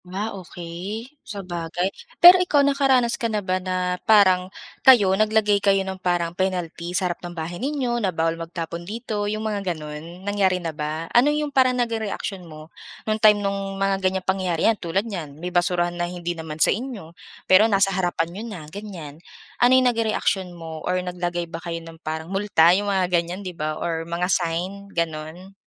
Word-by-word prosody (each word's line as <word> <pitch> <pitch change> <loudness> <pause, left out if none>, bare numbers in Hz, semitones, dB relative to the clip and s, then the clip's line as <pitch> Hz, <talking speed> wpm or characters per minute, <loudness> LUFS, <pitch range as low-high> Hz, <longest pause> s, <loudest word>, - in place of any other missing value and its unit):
Ah, 205 +4 -3
okey. 190 - -7
Sabagay. 180 -1 -4 0.2
Pero 360 +1 +9
ikaw 295 -6 +3
nakaranas 270 -4 +2
ka 230 - 0
na 215 - -1
ba 185 0 0
na 180 -1 -2
parang 185 -4 +5 0.3
kayo 210 -8 +6
naglagay 210 0 +2
kayo 195 -1 +4
ng 190 -1 -6
parang 175 -2 0
penalty 175 -2 -2
sa 190 - 0
harap 175 -1 -3
ng 175 -1 -8
bahay 170 +4 -5
ninyo 255 -4 -1
na 195 - +1
bawal 165 -1 0
magtapon 165 0 -6
dito 210 +2 -4
yung 215 +1 -3
mga 210 -2 -1
ganon 165 0 -6
nangyari 200 -2 +2
na 170 -3 -4
ba? 155 +2 -4
Ano 245 +4 +5
'yong 295 -1 -1
parang 255 -1 +3
naging 230 -2 -1
reaksyon 190 -4 -5
mo 155 +1 -12 0.3
nung 215 0 -1
time 210 -1 +5
nung 195 0 -3
mga 195 0 0
ganyang 185 0 0
pangyayari? 185 -3 0
Yan 225 -2 +2
tulad 185 +5 -1
niyan 165 -10 -6
may 180 +2 -6
basurahan 175 -1 +1
na 175 0 -2
hindi 175 -1 -4
naman 160 -2 -7
sa - - +5
inyo 215 -8 -7 0.3
pero 205 +4 +6
nasa 195 -1 +3
harapan 175 -3 0
n'yo 205 +4 -6
na 180 -8 -8
ganyan 170 -8 -8 0.4
ano 245 +1 +6
yung 260 - +4
naging 230 -2 +2
reaction 190 -2 0
mo 160 -1 -8
or 180 +3 -1
naglagay 175 -1 -3
ba 165 0 -8
kayo 170 -1 -4
ng 165 0 -11
parang 160 0 -4
multa 195 -4 +4
yung 205 +2 0
mga 190 -2 +2 0.2
ganyan 180 +4 -7
'di 180 - -5
ba 155 -1 -3
or 165 -1 -2
mga 170 +1 -1
sign 185 +4 -2
ganon? 165 +3 -4
185 Hz, 190 wpm, -23 LUFS, 170-205 Hz, 0.4 s, Pero